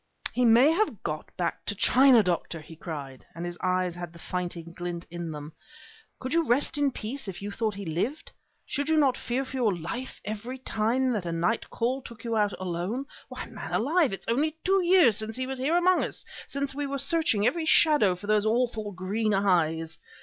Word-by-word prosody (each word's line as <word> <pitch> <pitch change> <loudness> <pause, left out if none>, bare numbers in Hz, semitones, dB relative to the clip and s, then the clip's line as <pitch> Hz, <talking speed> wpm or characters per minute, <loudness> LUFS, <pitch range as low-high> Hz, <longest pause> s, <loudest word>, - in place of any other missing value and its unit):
"He 250 - +2
may 240 +6 +6
have 335 - 0
got 155 -1 -4
back 170 -2 -2
to 205 - -1
China, 255 +2 +6
Doctor!" 175 -2 -1
he 155 +1 -12
cried, 145 -5 -7
and 170 +1 -5
his 175 0 -6
eyes 185 -1 +1
had 175 -1 -7
the - - -13
fighting 170 -1 -4
glint 175 -1 -5
in 175 -1 -5
them. 150 0 -7 0.7
"Could 260 +2 -4
you 335 0 +3
rest 265 0 +2
in 290 -1 +3
peace 245 +3 -5
if 180 -2 -6
you 205 +1 -5
thought 215 0 -1
that 200 - -7
he - - -6
lived? 180 - -3 0.3
Should 285 +1 -2
you 320 - +3
not 275 -4 +4
fear 260 +1 -2
for 265 - -6
your 220 -7 +2
life 230 +11 -5
every 220 +5 -5
time 250 +1 0
that 195 -6 -2
a - - -2
night 170 +7 0
call 250 +3 -1
took 235 -2 -11
you 230 -1 -2
out 205 -2 +1
alone? 185 +8 -3 0.2
Why, - - -6
man - - -8
alive, 305 +4 +2
it 195 -1 -5
is - - -12
only 305 +5 0
two 385 +1 +4
years 345 - +5
since 220 0 -1
he 255 - -2
was 265 0 -4
here 300 +7 +2
among 360 +1 +4
us, - - -4 0.2
since 280 0 -2
we 285 +1 -3
were 275 0 -2
searching 275 -7 +2
every 315 +7 +1
shadow 295 - +5
for 180 - -10
those 210 0 +3
awful 225 -2 0
green 200 +3 -1
eyes! 165 -5 +1
220 Hz, 215 wpm, -27 LUFS, 180-270 Hz, 0.7 s, may